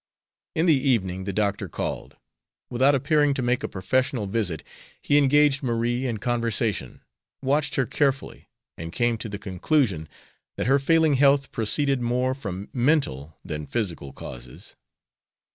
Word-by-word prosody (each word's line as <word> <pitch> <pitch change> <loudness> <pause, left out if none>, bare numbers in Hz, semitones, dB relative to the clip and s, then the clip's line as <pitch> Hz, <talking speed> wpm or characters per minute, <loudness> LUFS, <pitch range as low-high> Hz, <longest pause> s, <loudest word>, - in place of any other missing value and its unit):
In 160 - +2
the 165 - +6 0.2
evening 95 -6 0
the 100 - -2
doctor 100 -1 -1
called. - - -5 0.5
Without 130 +4 +4
appearing 145 +1 +2
to 130 - -2
make 125 +1 +1
a - - -2
professional 125 +4 -1
visit 95 -6 -2 0.4
he 145 - +1
engaged 145 0 +4
Marie 120 0 0
in 115 -3 -2
conversation, 115 -2 -1 0.4
watched 145 +3 +1
her 135 - +2
carefully, 140 +2 -1 0.3
and 80 0 -6
came 120 +2 +1
to 110 - -5
the 100 - -5
conclusion 95 - 0 0.5
that - - -1
her 135 +2 +4
failing 160 0 +3
health 140 0 +4
proceeded 135 +4 0
more 125 +2 0
from 100 -7 -6
mental 120 - 0
than 75 -1 -5
physical 90 -11 -3
causes. - - -10
120 Hz, 145 wpm, -25 LUFS, 100-140 Hz, 0.5 s, the